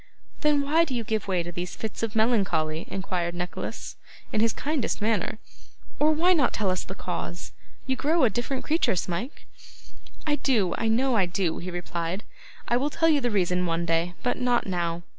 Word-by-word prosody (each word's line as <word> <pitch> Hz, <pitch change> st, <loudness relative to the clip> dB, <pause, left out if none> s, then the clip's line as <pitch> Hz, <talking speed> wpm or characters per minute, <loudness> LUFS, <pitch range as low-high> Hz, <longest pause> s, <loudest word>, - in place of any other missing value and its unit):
'Then 300 Hz, -2 st, +3 dB
why 305 Hz, +4 st, +4 dB
do 280 Hz, -6 st, -2 dB
you 235 Hz, -, -1 dB
give 220 Hz, -2 st, -1 dB
way 185 Hz, -3 st, +1 dB
to 175 Hz, -, -6 dB
these 175 Hz, +1 st, -5 dB
fits 220 Hz, -3 st, -5 dB
of 225 Hz, -2 st, -2 dB
melancholy?' 190 Hz, -9 st, +1 dB
inquired 180 Hz, -3 st, -2 dB
Nicholas, 180 Hz, 0 st, -5 dB, 0.4 s
in 215 Hz, -, +2 dB
his 230 Hz, 0 st, +4 dB
kindest 290 Hz, +2 st, -1 dB
manner; 215 Hz, -1 st, 0 dB, 0.6 s
'or 305 Hz, +1 st, +5 dB
why 340 Hz, +4 st, +4 dB
not 290 Hz, -8 st, +3 dB
tell 200 Hz, -3 st, +1 dB
us 185 Hz, -, -1 dB
the 190 Hz, -, -7 dB
cause? 175 Hz, -1 st, -5 dB, 0.3 s
You 260 Hz, -, 0 dB
grow 310 Hz, +4 st, +2 dB
a 245 Hz, -, +6 dB
different 250 Hz, +5 st, -2 dB
creature, 320 Hz, -, +2 dB
Smike.' 180 Hz, -, -3 dB, 0.8 s
'I 295 Hz, -1 st, +2 dB
do; 220 Hz, -12 st, +2 dB
I 225 Hz, -, +1 dB
know 245 Hz, +3 st, +3 dB
I 195 Hz, -4 st, +3 dB
do,' 175 Hz, -2 st, -1 dB
he 180 Hz, -, -5 dB
replied. 175 Hz, +2 st, -3 dB, 0.4 s
'I 240 Hz, -, +3 dB
will 280 Hz, +4 st, +1 dB
tell 325 Hz, +2 st, +2 dB
you 295 Hz, -3 st, +4 dB
the 245 Hz, -, +1 dB
reason 180 Hz, -3 st, +1 dB
one 165 Hz, +1 st, 0 dB
day, 165 Hz, +1 st, 0 dB
but 245 Hz, -, 0 dB
not 245 Hz, -1 st, +2 dB
now. 175 Hz, -2 st, -1 dB
215 Hz, 195 wpm, -26 LUFS, 175-265 Hz, 0.8 s, a